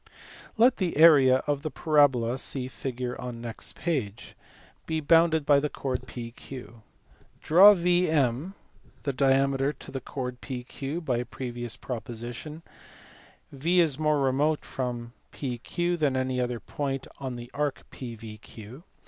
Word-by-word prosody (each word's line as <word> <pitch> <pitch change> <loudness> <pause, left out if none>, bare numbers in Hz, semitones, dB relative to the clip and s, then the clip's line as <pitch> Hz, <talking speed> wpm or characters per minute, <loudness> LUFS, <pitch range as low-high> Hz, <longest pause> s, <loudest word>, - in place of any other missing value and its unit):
Let 245 +3 +5
the 180 -6 -1
area 140 -5 +7
of 145 -1 0
the 155 - -3
parabola 135 -6 +2
(see 130 -2 -1
figure 125 -1 -4
on 125 -2 -6
next 115 -1 -7
page) 125 - -3 0.5
be 160 -1 0
bounded 160 0 +4
by 145 -1 +5
the 150 +1 -1
chord 130 -3 -4
PQ. 120 0 -9 0.6
Draw 195 +6 +8
VM 170 -3 +1 0.5
the 140 - -1
diameter 135 +1 +2
to 140 - -12
the 135 - -4
chord 125 -1 -5
PQ, 125 -2 -7 0.2
then - - -1
(by 130 -7 -1
a 120 - -3
previous 120 -3 -6
proposition), 120 +6 -6 0.9
V 165 +6 +1
is 155 -5 +2
more 150 -1 +2
remote 140 +3 +1
from 120 -2 -4 0.2
PQ 165 +7 -2
than 140 -4 +1
any 130 -1 0
other 120 -1 -2
point 135 0 -4 0.2
in 130 -2 -3
the 120 +1 -9
arc 145 -1 -2
PVQ. 115 +1 -9
135 Hz, 140 wpm, -27 LUFS, 125-155 Hz, 0.9 s, Draw